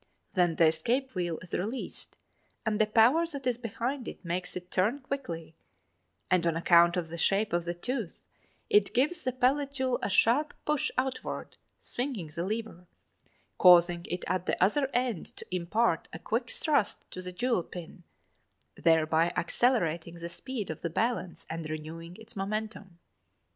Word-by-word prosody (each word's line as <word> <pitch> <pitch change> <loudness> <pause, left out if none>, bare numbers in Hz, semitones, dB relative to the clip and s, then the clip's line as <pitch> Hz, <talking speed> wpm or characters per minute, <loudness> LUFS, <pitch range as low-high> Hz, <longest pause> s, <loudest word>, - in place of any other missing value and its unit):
Then 175 -4 +3
the 165 - +5
escape 245 +12 +1
wheel 175 -4 -1
is 180 - -13
released 220 +8 -4 0.5
and 220 -1 +1
the 215 - +4
power 240 +10 +5
that 280 -5 -7
is 245 -2 0
behind 245 +3 -3
it - - -8
makes 180 +2 -2
it 180 0 -7
turn 210 +9 +2
quickly, 255 - -5 0.8
and 175 -2 +3
on 165 - +1
account 170 +1 +5
of 165 -2 -2
the 170 +1 -6
shape 200 +2 +2
of 175 0 +1
the 175 0 -2
tooth, 230 0 -4 0.4
it 420 - +3
gives 300 +7 +2
the 255 - 0
pallet 270 +3 +1
jewel 260 -2 0
a - - -1
sharp 255 +9 +3
push 300 -2 +1
outward, 255 0 -3 0.2
swinging 240 - -4
the 170 - -2
lever, 205 -3 -4 0.7
causing 175 -1 +7
it 180 - -3
at 185 -1 -1
the - - +1
other 265 +9 +3
end 245 - -1
to - - -7
impart 180 +1 +1
a - - -6
quick 230 +7 -2
thrust 285 -7 0
to 185 - -6
the 180 0 -6
jewel 235 +2 +1
pin, 175 0 -10 0.7
thereby 160 0 +3
accelerating 170 -6 +1
the 170 0 -6
speed 210 +3 -4
of 160 - -8
the 170 - -2
balance 205 0 -1
and 165 -1 -5
renewing 165 +3 -7
its 225 +1 -13
momentum. 200 -2 -4
195 Hz, 165 wpm, -30 LUFS, 170-250 Hz, 0.8 s, causing